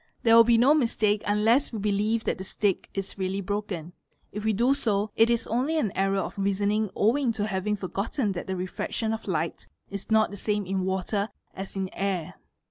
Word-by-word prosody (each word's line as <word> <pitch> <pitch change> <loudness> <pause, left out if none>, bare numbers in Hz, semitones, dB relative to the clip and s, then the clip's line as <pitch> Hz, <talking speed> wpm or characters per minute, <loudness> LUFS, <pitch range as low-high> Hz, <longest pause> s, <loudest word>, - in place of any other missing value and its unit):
There 230 -1 +6
will 230 - +9
be 235 0 +4
no 255 +6 +6
mistake 220 -7 +2
unless 220 +7 +3
we 230 - -4
believe 210 +2 0
that - - -1
the - - -4
stick 195 0 -1
is 195 0 -4
really 190 +1 -1
broken; 195 -4 -4 0.4
if 210 +1 -5
we 220 - +2
do 240 +6 +3
so, 210 -5 0
it 225 +1 +5
is 235 -1 +1
only 265 +8 0
an 220 -10 +1
error 195 +1 +1
of - - -6
reasoning' 200 +2 +1
owing 240 +4 +2
to 210 -1 -1
having 210 0 -1
forgotten 205 +4 -2
that 175 -2 -5
the 190 - -2
refraction 185 +4 -3
of 225 - -6
light 165 -3 -2 0.2
is 200 -1 -5
not 220 -1 +3
the 205 - -7
same 210 0 -1
in 190 0 -1
water 190 +2 -1 0.3
asin 195 0 -4
air. 190 -4 -2
205 Hz, 200 wpm, -27 LUFS, 195-225 Hz, 0.4 s, will